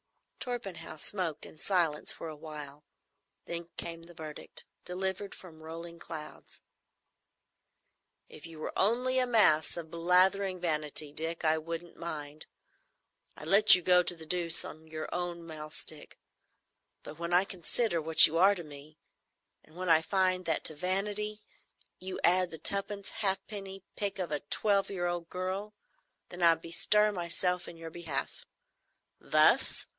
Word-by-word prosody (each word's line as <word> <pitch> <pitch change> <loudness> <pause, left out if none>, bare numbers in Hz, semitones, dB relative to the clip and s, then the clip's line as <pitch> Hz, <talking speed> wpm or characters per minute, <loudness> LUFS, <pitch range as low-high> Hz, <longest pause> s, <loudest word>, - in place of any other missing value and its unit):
Torpenhow 200 -10 -5
smoked 165 -2 -1
in 155 - -14
silence 170 -6 +1
for 165 - -5
a 155 - -7
while. 150 -2 -9 0.6
Then 170 0 -3
came 165 -1 -3
the 170 +1 -14
verdict, 155 -2 -4 0.2
delivered 190 +2 -3
from 160 -4 -13
rolling 165 +1 -9
clouds: 155 -3 -6 1.6
"If 155 - -11
you 165 -1 -11
were 155 - -6
only 250 +6 +3
a 255 - +3
mass 195 -11 +4
of 160 -2 -8
blathering 185 +3 +2
vanity, 150 -3 -1
Dick, 165 +2 -3
I 160 0 +2
wouldn't 165 +2 -7
mind,—I'd 155 -1 -11
let 200 +5 +10
you 180 - -3
go 180 0 +5
to 175 - +1
the 160 -1 -8
deuce 170 0 +3
on 160 +1 -11
your 155 0 -6
own 175 -1 -4
mahl 155 -2 -8
stick; 155 0 -5 0.9
but 155 - -11
when 170 0 -4
I 180 +2 +4
consider 185 0 -1
what 160 +1 +8
you 165 +2 +1
are 195 +3 +5
to 175 - -7
me, 150 0 -13 0.7
and 155 - -22
when 180 0 -4
I 160 -1 +5
find 185 +1 0
that 160 -2 -1
to 155 - +1
vanity 205 +5 -2 0.6
you 185 0 -6
add 180 +1 +3
the 160 - -9
twopenny 200 +4 0
halfpenny 195 -1 -2
pique 205 -1 -3
of 180 -4 -4
a 150 - -1
twelve 200 +7 +1
year 180 -3 -3
old 175 -1 -3
girl, 190 +3 -5 0.5
then 180 - -9
I 170 -1 +6
bestir 210 +6 +2
myself 180 -1 -3
in 170 - -10
your 165 0 -9
behalf. 160 -5 -5 0.7
Thus!" - - +4
170 Hz, 150 wpm, -30 LUFS, 160-190 Hz, 1.6 s, let